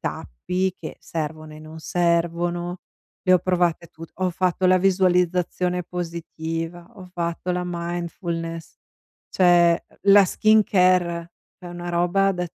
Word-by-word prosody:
tappi 180 - -3
che - - -8
servono 155 -1 -6
e - - -11
non 155 +1 -11
servono, 175 +1 -1 0.4
le 185 - +3
ho 185 - +6
provate 175 -2 0
tut 165 +1 -12
ho 185 0 -1
fatto 185 +1 0
la 185 0 +5
visualizzazione 180 -1 +1
positiva, 170 0 -5
ho 190 -3 -11
fatto 170 +1 -3
la 180 0 -1
mindfulness, 170 -1 -5 0.5
cioè, 175 -2 +4 0.2
la 200 0 +7
skincare 185 -5 +2 0.3
è 180 - -12
una 175 0 -7
roba 175 +3 +2
da 180 -1 -3
175 Hz, 125 wpm, -23 LUFS, 170-185 Hz, 0.5 s, la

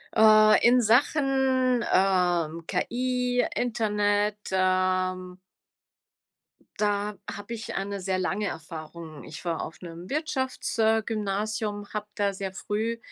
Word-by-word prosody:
Äh. 215 0 +7 0.2
In 245 +1 +6
Sachen, 260 0 +2
ähm, 175 -4 +2
KI, 250 +5 0
Internet, 210 -3 0
ähm 185 -1 0 1.4
da 205 0 0
habe 205 +3 -7
ich 225 -1 -6
eine 200 +1 -3
sehr 185 0 -1
lange 200 +3 -1
Erfahrung. 160 -1 -8
Ich 150 +2 -10
war 165 -2 -1
auf 160 - -8
'nem 170 +1 -9
Wirtschafts 270 -5 -2
äh, 220 0 +3
Gymnasium, 210 -1 -2
habe 210 0 -4
da 200 -1 0
sehr 190 0 -5
früh 220 +4 -2
205 Hz, 115 wpm, -26 LUFS, 185-230 Hz, 1.4 s, Äh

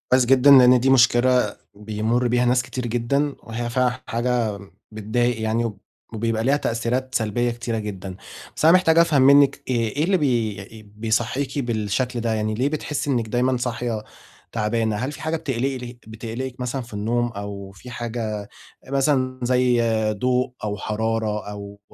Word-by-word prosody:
كويس 130 0 +4
جدًا 135 +2 +5
لأن 125 -2 +8
دي 135 - +2
مشكلة 125 -3 +4 0.2
بيمرّ 110 +4 -1
بيها 125 +1 +2
ناس 125 +1 +3
كتير 125 0 -5
جدًا، 135 +5 0
وهي 120 +1 -4
فعلًا 125 +1 0
حاجة 115 -3 -1 0.3
بتضايق 110 +2 -1
يعني، 110 +1 0 0.4
وبيبقى 115 0 -1
ليها 140 +3 +3
تأثيرات 125 +1 -2
سلبية 120 +2 0
كتيرة 115 -1 -3
جدًا، 95 -3 -6 0.4
بس - - -2
أنا 165 +3 +7
محتاج 165 -3 +4
أفهم 160 -5 +4
منِك 140 +1 +5
إيه 115 -3 -1
إيه 150 - +2
اللي 190 +2 +3
بي 110 - -2
بيصحّيكي 120 +6 -1
بالشكل 120 +1 -1
ده؟ 115 -1 0
يعني 110 0 -1
ليه 125 +6 +1
بتحسي 150 -1 -3
إنِك 120 -4 0
دايمًا 125 +3 +1
صاحية 120 -3 -3 0.5
تعبانة؟ 110 0 0
هل 130 +6 -3
في - - -10
حاجة 160 +1 -1
بتقلقل 130 -4 -3
بتقلقِك 115 +4 -6
مثلًا 125 +2 -3
في 115 -3 -12
النوم 115 +4 0
أو 100 -1 -7
في 110 +6 -13
حاجة 110 -4 -4 0.4
مثلًا 135 -2 +1
زي 125 -1 +2 0.3
ضوء 125 +4 0
أو 105 -1 -2
حرارة 110 0 -2
أو 100 0 -9
120 Hz, 155 wpm, -22 LUFS, 110-130 Hz, 0.5 s, لأن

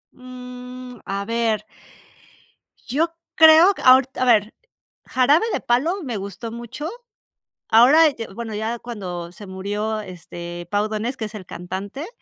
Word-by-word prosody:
Mm, 250 -1 -10
a 200 0 -3
ver 225 -1 0 1.2
yo 305 +7 0 0.3
creo 320 +4 +8
q - - -10
ahorit 260 +1 +5
a 255 - +1
ver, 220 -3 +3 0.5
"Jarabe 280 - +3
de - - 0
Palo", 315 +11 +1
me 245 -6 -3
gustó 200 +4 -6
mucho. 240 +7 -6 0.8
Ahora, 270 +9 +7
eh, 290 - -1
d 225 - -5
bueno, 225 +1 -6
ya 225 +3 -3
cuando 180 -8 -6
se 200 +3 -12
murió, 205 +3 -3
este, 175 -2 -8
Pau 205 +1 +1
Donés, 220 +4 -3
que 220 - -3
es 215 +1 -9
el 195 -3 -8
cantante, 195 - -6
230 Hz, 145 wpm, -22 LUFS, 205-255 Hz, 1.2 s, creo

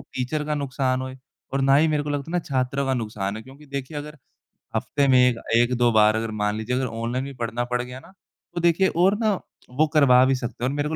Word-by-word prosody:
teacher 130 +4 -4
का 150 - -1
नुकसान 130 -2 -1
होए 130 0 -6 0.4
और 135 - 0
ना 135 0 +4
ही 160 +2 +4
मेरे 150 -1 +1
को 145 - -4
लगता 145 +2 -3
है - - -6
ना 180 - +2
छात्रों 135 -3 -1
का 130 - +1
नुकसान 105 -4 -3
है 110 - -7
क्योंकि 140 +4 -15
देखिए 140 +1 -5
अगर 150 +1 -7 0.6
हफ़्ते 140 -1 0
में 130 -1 +5
एक 125 -2 +4 0.2
एक 120 +2 +3
दो 120 -1 +3
बार 110 0 +5
अगर 110 0 -2
मान 105 0 +1
लीजिए 110 +3 -2
अगर 130 0 0
ऑनलाइन 115 +3 -3
भी 140 - -7
पढ़ना 115 +1 -1
पड़ 125 - +1
गया 125 +1 -8
ना 185 - -17 0.4
तो 175 - -1
देखिए 175 +3 +3
और 190 +4 +3
ना 215 -3 +2 0.4
वो 150 +5 +2
करवा 130 -4 +6
भी 135 0 +2
सकते 120 -1 -6
हैं 125 - +2
और 140 - -3
मेरे 145 +1 -1
को 160 - -2
130 Hz, 260 wpm, -24 LUFS, 120-145 Hz, 0.6 s, करवा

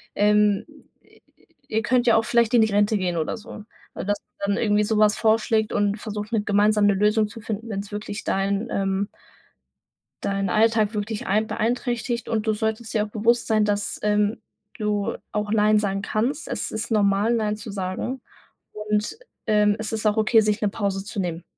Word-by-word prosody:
ähm, 210 -1 +3 1.0
ihr 220 -4 0
könnt 245 0 +2
ja 230 - +6
auch 225 - +1
vielleicht 235 0 +2
in 230 - +6
die 220 -1 +2
Rente 205 +1 +3
gehen“, 180 -3 -1
oder 160 +8 -2
so. 215 -1 -10 0.3
Dass - - -5 0.4
man 200 - +1
dann - - -3
irgendwie 210 -2 +2
so 215 +1 0
was 210 0 +4
vorschlägt 220 -1 +2
und 205 +1 +1
versucht, 210 0 -6
mit 215 -2 0
gemeinsam 210 0 +3
'ne 200 - +4
Lösung 210 +2 +2
zu 210 +2 -10
finden, 220 +1 -5
wenn's 200 0 -5
wirklich 210 0 -5
deinen, 195 +2 -1
ähm 195 0 0 1.2
deinen 195 0 -1
Alltag 220 0 +2
wirklich 210 +1 -3
ein 215 +3 +1
beeinträchtigt. 240 0 -2
Und 220 -1 -1
du 220 - +3
solltest 220 +2 -3
dir 215 - +2
auch - - -11
bewusst 230 +3 +1
sein, 215 -1 +3
dass, 205 0 -2
ähm, 210 +1 +1 0.4
du 210 -1 -1 0.2
auch 210 0 -2
Nein 215 0 +4
sagen 195 -1 -1
kannst. 240 +10 -1
Es - - -3
ist 220 +2 -4
normal, 205 +1 +2
Nein 210 -2 0
zu 215 0 -8
sagen 195 +7 -4 0.5
und, 210 - -2 0.3
ähm, 210 -1 +3
es 215 - -4
ist 220 0 -3
auch 210 +1 +2
okay, 220 +1 +4
sich 210 +1 0
'ne 210 - +2
Pause 195 -2 -2
zu 205 0 -6
nehmen. 175 -2 -3
210 Hz, 185 wpm, -24 LUFS, 205-220 Hz, 1.2 s, ja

